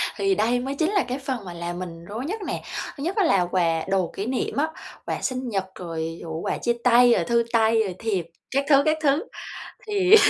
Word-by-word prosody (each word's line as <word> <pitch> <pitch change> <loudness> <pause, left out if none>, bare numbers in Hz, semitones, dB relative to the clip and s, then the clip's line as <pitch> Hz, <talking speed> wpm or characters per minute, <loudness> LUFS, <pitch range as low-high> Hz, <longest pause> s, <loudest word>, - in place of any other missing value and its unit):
Thì 390 -1 +2
đây 240 -1 +2
mới 270 +3 -3
chính 320 +6 +1
là 395 - +3
cái 255 +2 -3
phần 260 -6 -4
mà 175 - -6
làm 175 +1 -4
mình 170 -2 -7
rối 220 +7 -5
nhất 420 +7 -3
nè. - - -3 0.3
Thứ 280 - -5
nhất 355 +5 -1
á 415 - +3
là 195 - +4
quà 165 -3 +2
đồ 190 -3 +1
kỷ 200 - -3
niệm 255 +2 -1
á, 300 +3 +3 0.4
quà - - -3
sinh 255 -1 -2
nhật, 195 -3 -1
rồi, 165 -2 -4
ờ, 165 - -7
quà - - -1
chia 240 - +1
tay, 245 0 +7
rồi - - +2
thư 235 -1 +2
tay, 225 0 +4
rồi 185 -3 -4
thiệp, 200 -7 -1 0.3
các 275 +1 +1
thứ, 275 -1 +7
các 310 0 +3
thứ, 285 +2 +3 0.6
thì 405 -1 +6
235 Hz, 235 wpm, -25 LUFS, 185-280 Hz, 0.6 s, tay